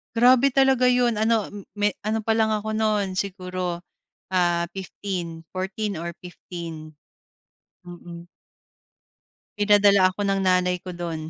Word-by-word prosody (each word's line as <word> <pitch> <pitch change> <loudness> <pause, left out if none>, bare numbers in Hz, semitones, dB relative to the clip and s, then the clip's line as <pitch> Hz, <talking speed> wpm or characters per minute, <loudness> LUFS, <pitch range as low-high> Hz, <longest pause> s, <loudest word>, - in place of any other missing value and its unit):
Grabe 255 +3 +5
talaga 265 -1 +4
yun 245 -1 +2
ano, 220 0 +1
hmm, 205 -2 -11
may 205 -1 +1
ano 215 +1 -1
palang 220 0 +1
ako 215 0 -2
no'n 210 -3 0
siguro, 185 -2 -3 0.5
ah, 175 -2 +1
15. 180 -3 -6
14 190 +1 -3
or 170 +1 -5
15. 165 -3 -9 0.9
Mm. 175 -1 -10 1.3
Pinadala 205 -1 +5
ako 185 - -9
ng 195 0 +1
nanay 180 0 +3
ko 180 - -9
do'n. 170 -2 -4
195 Hz, 120 wpm, -24 LUFS, 175-215 Hz, 1.3 s, Grabe